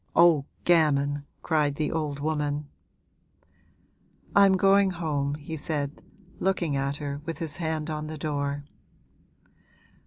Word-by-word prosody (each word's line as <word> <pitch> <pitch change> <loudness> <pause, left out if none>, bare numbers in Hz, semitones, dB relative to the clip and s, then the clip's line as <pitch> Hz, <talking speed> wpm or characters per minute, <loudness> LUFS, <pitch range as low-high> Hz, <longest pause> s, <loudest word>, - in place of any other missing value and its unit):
'Oh, 165 -5 +6 0.2
gammon!' 145 -4 +3 0.2
cried 150 -3 +1
the 150 0 -1
old 150 -3 -2
woman. 150 -1 -1 1.7
'I'm 200 -1 +7
going 195 +1 +5
home,' 150 -5 -1
he 150 +2 -6
said, 145 -1 -3 0.4
looking 175 -6 0
at 140 +1 -1
her 145 -1 -5
with 165 0 -5
his 160 -4 -4
hand 160 -2 -2
on 155 0 -3
the 155 0 -6
door. 145 -1 -2
150 Hz, 120 wpm, -27 LUFS, 145-165 Hz, 1.7 s, I'm